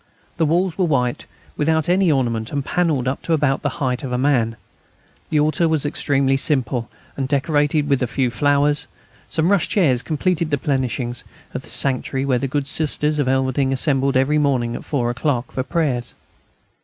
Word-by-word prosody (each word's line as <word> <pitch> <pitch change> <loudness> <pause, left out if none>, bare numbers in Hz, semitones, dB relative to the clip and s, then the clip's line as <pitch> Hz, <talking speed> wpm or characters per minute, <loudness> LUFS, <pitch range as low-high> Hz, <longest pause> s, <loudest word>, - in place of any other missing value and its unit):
The 160 -2 +2
walls 175 +3 0
were 185 - +3
white, 125 -6 0 0.3
without 160 0 +1
any 180 -1 +3
ornament, 115 -5 -1
and 140 -2 -2
panelled 155 -8 0
up 130 - -2
to 165 - -1
about 145 -3 +1
the 145 - 0
height 130 -2 -1
of 130 - -4
a 125 - 0
man. 125 -4 +1 0.7
The 155 - +2
altar 155 +3 +2
was 155 -2 +1
extremely 135 -2 +1
simple, 130 -5 0 0.3
and 135 -1 -2
decorated 145 +1 +1
with 140 -3 +1
a 125 - +1
few 125 0 0
flowers. 145 +2 +2 0.4
Some 165 +4 +1
rush 200 -5 +2
chairs 140 - +2
completed 165 +2 -1
the 145 - +1
plenishings 130 -3 -2 0.3
of - - -4
the - - -14
sanctuary 135 0 0
where 130 -3 +1
the 135 - -2
good 140 +1 -2
Sisters 150 0 +1
of 145 - +1
Elverdinghe 130 +1 +1
assembled 135 -1 +1
every 145 +4 +2
morning 125 -5 0
at - - -8
four 120 -5 -1
o'clock 125 -1 -2
for 130 - -2
prayers. 130 -5 -2
140 Hz, 180 wpm, -20 LUFS, 130-155 Hz, 0.7 s, were